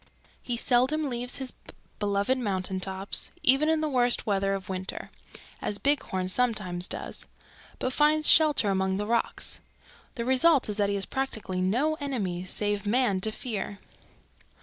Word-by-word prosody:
He 240 -1 -2
seldom 260 +6 +2
leaves 245 +1 -2
his 265 -2 -4 0.5
beloved 205 +5 0
mountain 190 -4 -2
tops, 190 +1 -1
even 270 +4 +5
in 320 -1 +2
the 310 - 0
worst 245 -4 +3
weather 195 -1 0
of 190 -1 -7
winter, 190 0 -5 0.5
as 205 - -1
Bighorn 205 -9 0
sometimes 190 -5 +1
does, - - -5 0.5
but 255 - -2
finds 305 +2 +3
shelter 300 -10 +5
among 190 0 0
the 205 - -2
rocks. 230 +1 -1 0.6
The 235 -3 -3
result 260 +1 +3
is 210 - -2
that 205 -1 +1
he 200 - 0
has 195 -1 -1
practically 220 -8 -3
no 260 +12 +1
enemies 190 -11 -3
save 205 0 -1
man 215 -4 +1
to 220 - 0
fear. 210 -3 -5
220 Hz, 150 wpm, -27 LUFS, 195-260 Hz, 0.6 s, even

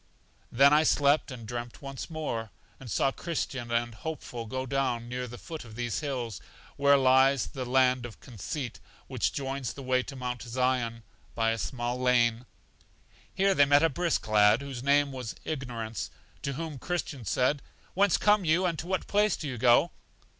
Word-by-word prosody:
Then 140 +4 +6
I 150 - +6
slept, 145 -1 +3
and 120 -4 -8
dreamt 120 0 -6
once 135 +2 -6
more, 135 -9 -3 0.3
and 130 - -10
saw 135 - +2
Christian 135 -7 -4
and 120 0 0
Hopeful 120 -3 -6
go 130 +3 -3
down 125 -3 -1
near 125 +1 -4
the 120 +1 -9
foot 160 +3 -8
of 115 -2 -12
these 120 -1 -2
hills, 125 - -4 0.3
where 140 0 +5
lies 130 -2 +4
the 130 -1 -6
land 130 -1 +3
of 115 - -14
Conceit, 120 +2 -6 0.3
which - - -1
joins 135 -2 -3
the 140 - -9
way 130 0 +2
to 135 - -9
Mount 125 -2 -4
Zion, 120 -1 -1 0.3
by 115 -1 +2
a 115 - -2
small 120 0 -3
lane. 120 -1 +2 0.8
Here 195 +1 +2
they 145 -6 +5
met 145 +2 +5
a 165 - +5
brisk 170 -1 -1
lad, 105 +2 +5
whose 135 -3 -6
name 140 +1 +3
was 125 -4 -6
Ignorance, 120 -7 -4 0.3
to 140 - -2
whom 155 -1 -5
Christian 165 -6 -3
said: 125 +7 +1 0.3
Whence 200 0 +3
come 210 -1 +3
you, 170 +3 +2
and 170 -3 -1
to 170 - -5
what 190 -1 -1
place 210 -1 +2
do 155 - -5
you 125 -4 -5
go? 125 +8 +5
130 Hz, 180 wpm, -29 LUFS, 120-145 Hz, 0.8 s, Then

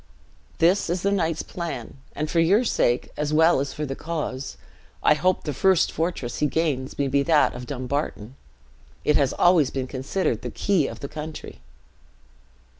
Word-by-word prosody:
"This 175 +2 +3
is 175 +1 -1
the 200 - +2
knight's 165 -5 0
plan; 160 -10 -6 0.2
and 155 - -2
for 165 - 0
your 195 +8 +4
sake, 120 - +1
as 150 0 -1
well 160 0 +4
as 140 0 -2
for 150 - -4
the 135 -1 -4
cause. 150 -5 -4 0.5
I - - +6
hope 185 +4 +1
the 150 - -3
first 190 +5 +3
fortress 160 -7 -3
he 150 - +3
gains 140 -4 -1
may 140 - +1
be 140 +1 +2
that 155 +1 +3
of 125 0 -8
Dumbarton. 130 -4 -3 0.7
It 150 - +3
has 140 -3 +2
been - - -8
always 175 -6 +5
considered 135 +7 -2
the - - -4
key 185 -9 +1
of - - -8
the 140 - -4
country." 150 - -8
150 Hz, 175 wpm, -24 LUFS, 135-170 Hz, 0.7 s, I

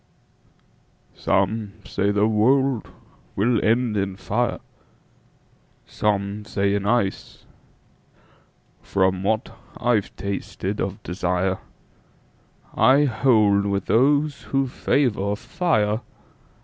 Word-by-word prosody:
SOME 100 +1 0
say 100 - -1
the 105 +1 +2
world 125 +3 +2 0.5
will 115 +3 +1
end 115 0 +2
in 100 -1 -1
fire, 120 +5 -1 1.3
Some 100 0 -1
say 100 -1 0
in 100 0 -1
ice. 105 -4 -1 1.4
From 95 -1 0
what 110 +4 -1 0.2
I've 120 -4 0
tasted 100 0 -4
of 100 +2 -4
desireI 90 +1 -1 1.5
hold 110 -5 +3
with 100 -1 -1
those 145 +4 +2
who 135 0 0
favor 120 -6 0
fire. 110 - 0
105 Hz, 85 wpm, -23 LUFS, 100-120 Hz, 1.5 s, hold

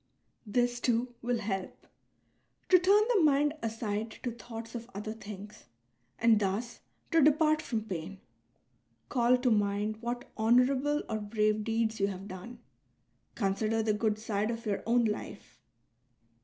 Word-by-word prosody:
This, 245 +3 +1
too, 240 0 0
will 245 0 0
help 195 -4 -4 0.4
— - - -43
to 365 - +7
turn 395 +4 +5
the 405 - +4
mind 295 -1 +4
aside 220 -1 -2
to 245 - -1
thoughts 230 -1 -9
of 235 0 -7
other 210 +2 -4
things 210 -1 -10 0.5
and 225 -2 +4
thus 210 +4 -2 0.3
to 330 - +5
depart 305 +1 +4
from 225 -7 -2
pain. 190 -1 -6 0.9
Call 245 0 +3
to 250 -1 +1
mind 205 0 +1
what 240 +1 -4
honourable 255 +6 +3
or 220 -1 -2
brave 215 0 0
deeds 225 0 0
you 200 - +2
have 195 0 -6
done; 205 +6 -9 0.8
consider 215 +2 0
the 215 -1 +2
good 210 0 0
side 215 -1 -1
of 230 0 -4
your 205 -2 -1
own 235 0 +3
life.' 200 - -5
225 Hz, 145 wpm, -30 LUFS, 210-245 Hz, 0.9 s, to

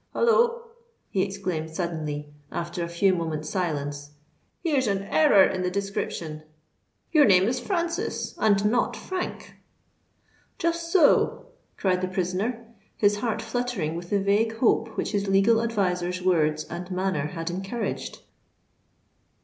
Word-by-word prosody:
Holloa!" 475 0 +3 0.5
he 190 - +1
exclaimed 185 -5 -3
suddenly, 155 -3 -4 0.2
after 170 +1 -3
a 170 - -4
few 185 +3 +3
moments' 160 -3 -3
silence: 145 -5 -3 0.5
"here's 285 -7 +1
an 195 -1 0
error 205 -3 +5
in 185 -1 +1
the 180 - 0
description. 180 -5 -3 0.7
Your 305 -4 +6
name 185 -3 +6
is 245 +5 0
Francis, 340 -1 -2
and 205 -2 +3
not 235 +4 +2
Frank." 370 -1 -5 1.0
"Just 335 0 -1
so!" 365 +7 +4 0.3
cried 185 -2 +1
the 185 - 0
prisoner, 190 +6 -2 0.3
his 205 -1 +3
heart 225 0 -2
fluttering 225 -9 -2
with 175 +1 -7
the 205 - +2
vague 210 +3 +1
hope 225 -1 +1
which - - -1
his 200 -1 -1
legal 195 +4 +4
adviser's 180 -6 -1
words 155 -4 +2
and 175 +3 -7
manner 185 -5 -1
had 165 +1 -4
encouraged. 195 +6 -4
195 Hz, 135 wpm, -26 LUFS, 170-230 Hz, 1.0 s, Your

